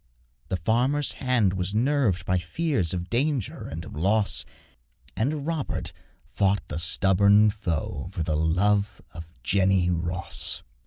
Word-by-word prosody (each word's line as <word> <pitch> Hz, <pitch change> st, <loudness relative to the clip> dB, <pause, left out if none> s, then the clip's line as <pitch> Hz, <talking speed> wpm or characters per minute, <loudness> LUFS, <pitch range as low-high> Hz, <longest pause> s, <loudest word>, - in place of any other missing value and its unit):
The 95 Hz, -, -1 dB
farmer's 125 Hz, -, +1 dB
hand 125 Hz, -7 st, +1 dB
was 95 Hz, +2 st, -3 dB
nerved 125 Hz, -5 st, +1 dB
by 90 Hz, 0 st, +1 dB
fears 95 Hz, -, -1 dB
Of 90 Hz, -1 st, -3 dB
danger 130 Hz, -2 st, -1 dB
and 80 Hz, +3 st, -7 dB
of -, -, -10 dB
loss; 95 Hz, -, +1 dB, 0.7 s
And 140 Hz, +5 st, -1 dB
Robert 160 Hz, -4 st, -3 dB, 0.3 s
fought 100 Hz, 0 st, 0 dB
the 75 Hz, -, -2 dB
stubborn 100 Hz, +5 st, +5 dB
foe 85 Hz, -6 st, -4 dB
For 85 Hz, -4 st, -3 dB
the 80 Hz, -1 st, -1 dB
love 100 Hz, +6 st, +1 dB
of 80 Hz, -1 st, -10 dB
Jenny 95 Hz, -2 st, +2 dB
Ross. 85 Hz, +1 st, -2 dB
95 Hz, 135 wpm, -25 LUFS, 85-115 Hz, 0.7 s, stubborn